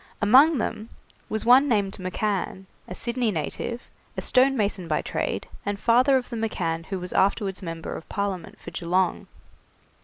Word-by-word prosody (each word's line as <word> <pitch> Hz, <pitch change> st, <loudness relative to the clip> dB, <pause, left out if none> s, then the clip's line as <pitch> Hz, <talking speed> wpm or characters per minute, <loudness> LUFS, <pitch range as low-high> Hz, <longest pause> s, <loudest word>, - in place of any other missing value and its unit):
Among 270 Hz, +9 st, +6 dB
them 220 Hz, -1 st, -3 dB, 0.4 s
was 220 Hz, 0 st, -1 dB
one 255 Hz, +4 st, +7 dB
named 200 Hz, -4 st, +1 dB
McCann, 190 Hz, 0 st, -2 dB, 0.2 s
a 180 Hz, -, -7 dB
Sydney 235 Hz, +1 st, -1 dB
native, 215 Hz, +6 st, -3 dB, 0.3 s
a -, -, -1 dB
stonemason 225 Hz, -9 st, +2 dB
by 155 Hz, -, 0 dB
trade, -, -, -3 dB, 0.2 s
and 200 Hz, 0 st, -3 dB
father 250 Hz, +5 st, +4 dB
of 250 Hz, -, -4 dB
the 235 Hz, -, -3 dB
McCann 165 Hz, -7 st, -2 dB
who 190 Hz, -1 st, -3 dB
was 180 Hz, 0 st, -5 dB
afterwards 195 Hz, 0 st, +1 dB
member 165 Hz, -2 st, -5 dB
of -, -, -10 dB
Parliament 195 Hz, -4 st, -4 dB
for -, -, -9 dB
Geelong. 180 Hz, +1 st, 0 dB
205 Hz, 155 wpm, -25 LUFS, 185-235 Hz, 0.4 s, one